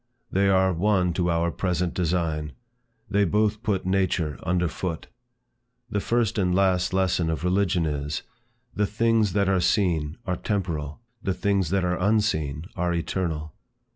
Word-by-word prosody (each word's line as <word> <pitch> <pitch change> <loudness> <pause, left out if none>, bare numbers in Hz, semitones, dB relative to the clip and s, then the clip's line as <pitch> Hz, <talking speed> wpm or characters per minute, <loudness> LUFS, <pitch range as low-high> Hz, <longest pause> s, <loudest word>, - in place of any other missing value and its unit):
They 100 +1 +3
are 95 -1 +3
one 90 0 +2
to 90 0 0
our 85 0 +1
present 90 -1 -1
design. 80 -4 -1 0.5
They 100 0 +2
both 105 +3 +1
put 100 -6 -1
nature 95 -5 0
under 90 0 +1
foot. 85 +1 -4 0.9
The 105 - 0
first 115 0 0
and 90 -2 +2
last 95 -2 +2
lesson 90 -3 +1
of 80 +1 -2
religion 90 -2 +2
is, 75 0 -3 0.5
"The 105 -1 +1
things 110 -2 +2
that 100 -1 +2
are 95 -1 +2
seen, 85 -7 +1
are 90 -2 -1
temporal; 85 -6 -3 0.2
the 95 -3 -1
things 100 -4 +1
that 95 +1 +1
are 90 0 0
unseen, 90 -8 +1
are 90 0 0
eternal." 80 -3 -2
90 Hz, 150 wpm, -25 LUFS, 85-100 Hz, 0.9 s, They